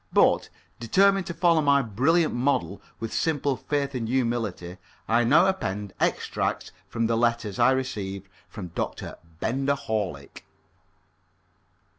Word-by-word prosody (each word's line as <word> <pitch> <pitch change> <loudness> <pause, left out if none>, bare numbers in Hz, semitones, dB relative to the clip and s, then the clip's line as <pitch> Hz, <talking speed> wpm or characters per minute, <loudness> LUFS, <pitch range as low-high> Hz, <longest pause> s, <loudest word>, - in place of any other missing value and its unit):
But, - - +3 0.3
determined 195 - +3
to 170 - -4
follow 170 -1 +3
my 140 -1 +3
brilliant 140 - +2
model 120 -8 0 0.2
with 115 - -5
simple 145 -4 0
faith 140 +1 -2
and 120 -3 -3
humility, 115 -8 -2 0.3
I 115 +2 +3
now 155 +9 +5
append 105 - -2
extracts - - -1 0.2
from 115 -1 -1
the 115 0 +1
letters 115 -3 0
I - - +6
received 100 -8 -2 0.2
from 95 -5 -7
Dr. - - -5 0.2
Benger 135 +7 0
Horlick. 105 - -4
120 Hz, 125 wpm, -26 LUFS, 105-140 Hz, 0.3 s, I